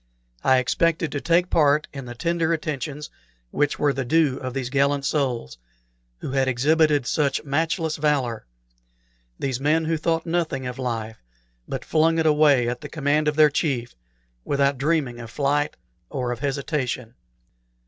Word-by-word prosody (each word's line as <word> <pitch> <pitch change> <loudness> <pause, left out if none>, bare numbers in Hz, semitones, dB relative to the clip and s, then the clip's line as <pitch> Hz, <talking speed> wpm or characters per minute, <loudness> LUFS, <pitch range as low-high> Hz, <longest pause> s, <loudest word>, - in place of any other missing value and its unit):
I 130 - +5
expected 165 +5 +1
to 145 - -3
take 170 +1 +3
a - - -30
part 150 -1 +3
in 135 -2 -7
the 120 0 -8
tender 170 +4 0
attentions 150 -1 -4 0.4
which 145 0 0
were 145 -1 +2
the 135 - -2
due 145 0 +2
of 130 0 -6
these 130 -2 -3
gallant 140 0 +1
souls, 130 - -1 0.6
who - - -4
had 135 -1 +1
exhibited 145 +2 +2
such 145 0 0
matchless 160 +2 -1
valor; 135 - 0 0.9
these 130 -3 -2
men 155 +3 +2
who 165 0 0
thought 165 +1 -1
nothing 165 -6 -1
of 125 +1 -5
life, 115 -3 -4 0.5
but - - -5
flung 165 +1 +2
it 160 - +1
away 150 -5 +4
at 120 +1 -3
the - - -8
command 150 0 0
of 150 - +1
their 155 -1 +6
chief 135 -6 -1 0.5
without 140 -1 +1
dreaming 140 -5 0
of 115 -1 -8
flight 145 +3 0 0.3
or 125 -2 -2
of 120 - -4
hesitation. 135 -4 -2
145 Hz, 160 wpm, -23 LUFS, 130-155 Hz, 0.9 s, their